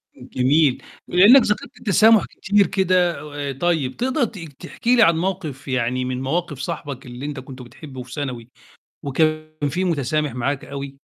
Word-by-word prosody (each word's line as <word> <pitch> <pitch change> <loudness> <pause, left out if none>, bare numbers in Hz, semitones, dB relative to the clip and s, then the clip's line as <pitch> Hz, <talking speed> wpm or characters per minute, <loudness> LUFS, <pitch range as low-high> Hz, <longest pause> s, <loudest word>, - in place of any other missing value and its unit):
جميل، 135 +2 +1 0.3
ولإنك 210 +10 +7
ذكرت 210 - -3
التسامح 220 +1 +4
كتير 200 0 +1
كده، 180 -4 +1 0.3
طيب 145 -2 -1
تقدَر 260 +3 0
ت 210 -2 -3
تحكي 165 - -2
لي 235 - +6
عن 165 -3 +4
موقف 165 -7 -4
يعني 125 0 -1
من 130 0 -3
مواقف 150 +1 -2
صاحبك 145 -3 -5
اللي 125 +2 -8
أنت 145 -2 -5
كنت 130 0 -10
بتحبه 130 +2 -10
في 125 - -13
ثانوي، 130 -5 -5 0.5
وكان 155 +1 -1
فيه 180 +7 -2
متسامح 155 -2 0
معاك 135 +3 -2
أوي؟ 140 0 -6
150 Hz, 150 wpm, -21 LUFS, 130-180 Hz, 0.5 s, ولإنك